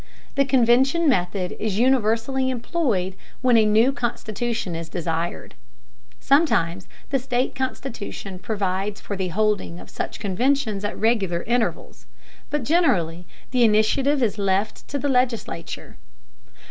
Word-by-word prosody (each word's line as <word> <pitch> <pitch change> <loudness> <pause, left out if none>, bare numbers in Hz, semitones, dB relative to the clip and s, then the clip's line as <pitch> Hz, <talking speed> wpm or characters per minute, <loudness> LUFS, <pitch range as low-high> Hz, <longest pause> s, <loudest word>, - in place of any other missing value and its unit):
The 275 0 +2
convention 265 +5 +3
method 180 -6 0
is 210 -3 -1
universally 255 +2 +2
employed 235 - -1 0.3
when 250 -2 +4
a 220 -1 +5
new 220 +5 +4
constitution 235 -5 -3
is 165 0 -5
desired. 165 0 -3 0.7
Sometimes 190 - +2 0.2
the 270 - +2
state 250 0 -1
constitution 230 -7 -5
provides 200 -1 -2
for 200 - -5
the 190 -1 -2
holding 205 -2 0
of - - -13
such - - -5
conventions 215 +1 0
at 205 - -3
regular 200 -7 +1
intervals, 235 0 -2 0.4
but 295 -2 -1
generally 180 - +1 0.2
the 250 -1 +3
initiative 245 +6 +3
is 210 -2 0
left 200 +1 0
to 285 - -3
the 285 - -1
legislature. 250 - -2
225 Hz, 125 wpm, -23 LUFS, 190-260 Hz, 0.7 s, a